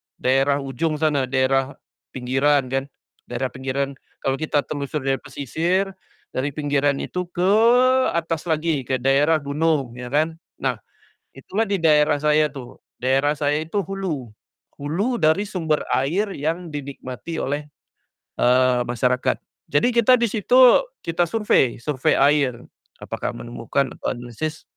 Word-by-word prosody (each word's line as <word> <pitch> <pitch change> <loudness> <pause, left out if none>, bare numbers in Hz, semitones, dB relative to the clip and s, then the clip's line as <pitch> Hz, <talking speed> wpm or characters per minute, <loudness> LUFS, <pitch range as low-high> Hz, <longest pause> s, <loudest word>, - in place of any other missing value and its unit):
daerah 135 +2 +1
ujung 140 +4 -2
sana 150 -4 +1
daerah, 135 +1 +1 0.4
pinggiran 135 +1 +1
kan, 135 +1 -1 0.4
daerah 125 +1 -3
pinggiran. 135 +1 -2 0.3
Kalau 135 +1 0
kita 150 -2 0
telusur 145 0 -4
dari 135 0 0
pesisir, 175 - -1 0.4
dari 130 +2 -1
pinggiran 145 -1 +1
itu 180 0 -4
ke 180 +2 0 0.6
atas 165 0 -2
lagi 155 -5 0
ke 130 - +1
daerah 145 +3 +3
gunung, 145 -2 0
ya 125 - -6
kan. 155 +5 0 0.2
Nah, - - 0 0.6
itulah 200 +11 -2
di 200 - +1
daerah 155 -3 +4
saya 150 +1 +3
tuh, 135 -4 -11 0.2
daerah 135 +4 +1
saya 145 0 0
itu 175 +6 -2
hulu, 165 - -4 0.5
hulu 195 - -1
dari 160 +5 +3
sumber 165 -7 -1
air 185 +10 0
yang 165 +2 -3
dinikmati 140 +2 -6
oleh, 145 0 -3 0.7
eee, 125 0 +4
masyarakat. 125 +1 0 0.3
Jadi 145 +9 +1
kita 240 +1 +5
di 235 - +2
situ 220 +4 +2 0.4
kita 165 +1 0
survei 170 - +1
survei 130 +1 0
air, 145 -2 +4 0.5
apakah - - -4
menemukan 120 +3 -3
atau - - -3
analisis 125 +6 -5
145 Hz, 135 wpm, -22 LUFS, 135-165 Hz, 0.7 s, kita